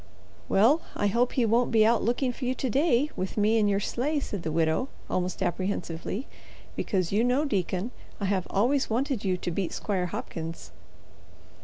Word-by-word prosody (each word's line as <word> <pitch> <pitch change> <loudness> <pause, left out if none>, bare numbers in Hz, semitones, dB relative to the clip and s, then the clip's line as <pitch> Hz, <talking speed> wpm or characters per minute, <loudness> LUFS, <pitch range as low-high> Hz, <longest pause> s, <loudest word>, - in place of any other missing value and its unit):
"Well, 250 +11 +5
I - - 0
hope 235 +5 +2
he 245 - +2
won't 235 +2 +3
be 220 -2 +5
out 230 +1 +4
looking 245 +3 0
for 255 - -5
you 255 +1 0
to 260 - -2
day, 290 +1 +2
with 185 +3 -4
me 215 +2 +3
in 210 - +3
your 200 -1 +2
sleigh," 285 +8 -1
said 205 -8 -4
the 160 - -3
widow, 160 - +1 0.2
almost 185 +1 -1
apprehensively, 185 +4 -2 0.5
"because, 185 -4 -1
you 210 +3 +3
know, 255 +5 +2
deacon, 195 - -1 0.3
I 200 - -1
have 190 -2 0
always 260 +7 +2
wanted 255 +1 0
you 185 -2 +1
to 175 - -3
beat 180 +1 -2
Squire 190 -4 -1
Hopkins." 165 -1 -6
210 Hz, 180 wpm, -27 LUFS, 185-250 Hz, 0.5 s, Well